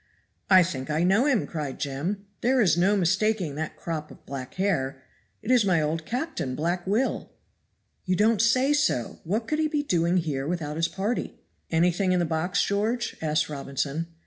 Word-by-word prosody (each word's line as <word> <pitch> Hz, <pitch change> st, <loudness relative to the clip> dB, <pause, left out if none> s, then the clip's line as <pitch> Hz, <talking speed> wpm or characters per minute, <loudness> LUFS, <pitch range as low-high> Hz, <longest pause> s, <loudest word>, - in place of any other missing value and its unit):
"I 185 Hz, -2 st, +8 dB
think 155 Hz, -6 st, -4 dB
I 155 Hz, +2 st, +1 dB
know 200 Hz, +10 st, +3 dB
him," 260 Hz, -7 st, +2 dB
cried 150 Hz, -5 st, -5 dB
Jem. 160 Hz, +9 st, -3 dB, 0.2 s
"There 255 Hz, +2 st, +3 dB
is 180 Hz, -9 st, +4 dB
no 190 Hz, +4 st, +3 dB
mistaking 190 Hz, -2 st, +1 dB
that 155 Hz, +2 st, -4 dB
crop 155 Hz, -2 st, -4 dB
of -, -, -15 dB
black 130 Hz, -2 st, -7 dB
hair; 140 Hz, -9 st, -1 dB, 0.4 s
it 240 Hz, -, -1 dB
is 250 Hz, -3 st, +5 dB
my 185 Hz, -4 st, +3 dB
old 155 Hz, +1 st, -2 dB
captain, 245 Hz, -, -3 dB
Black 175 Hz, +4 st, -2 dB
Will." 220 Hz, +7 st, 0 dB, 0.8 s
"You 185 Hz, -, +1 dB
don't 215 Hz, +2 st, +3 dB
say 255 Hz, +5 st, +3 dB
so! 270 Hz, -, 0 dB
What 215 Hz, +7 st, -2 dB
could 305 Hz, -, -1 dB
he 315 Hz, -, +2 dB
be 300 Hz, -1 st, -1 dB
doing 175 Hz, -, +1 dB
here 145 Hz, -5 st, -1 dB
without 155 Hz, -3 st, -3 dB
his 165 Hz, 0 st, +2 dB
party?" 205 Hz, +7 st, -3 dB, 0.3 s
"Anything 175 Hz, +3 st, +2 dB
in 180 Hz, -, +2 dB
the 175 Hz, -, +1 dB
box, 170 Hz, +4 st, 0 dB
George?" 220 Hz, +4 st, -1 dB
asked 155 Hz, -1 st, +1 dB
Robinson. 140 Hz, +2 st, -3 dB
180 Hz, 180 wpm, -26 LUFS, 155-215 Hz, 0.8 s, I